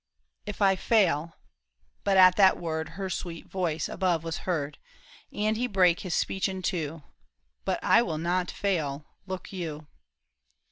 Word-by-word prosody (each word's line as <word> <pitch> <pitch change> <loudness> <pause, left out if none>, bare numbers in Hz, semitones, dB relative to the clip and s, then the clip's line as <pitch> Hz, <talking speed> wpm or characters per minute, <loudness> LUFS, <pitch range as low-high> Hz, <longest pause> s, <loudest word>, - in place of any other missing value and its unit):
" - - -51
If 205 - -3
I 195 -1 +5
fail—" 170 -7 +2 0.7
but 195 -1 +2
at 185 -1 +8
that 190 -2 +5
word 160 -2 -3
Her 195 -1 -3
sweet 175 -3 -5
voice 175 -4 -2
above 175 -4 0
was 165 -1 -3
heard, 150 -4 -2 0.5
And 215 +1 0
he 245 +3 0
brake 180 -5 +3
his 180 -3 -3
speech 190 +1 0
in 190 -1 -5
two; 160 -4 -2 0.2
— 65 -1 -44
" - - -48
But - - 0
I 230 - +5
will 165 -9 -2
not 175 +3 0
fail, 150 -7 -2 0.2
look 185 +1 -6
you." 160 -5 -5
175 Hz, 170 wpm, -28 LUFS, 160-190 Hz, 0.7 s, at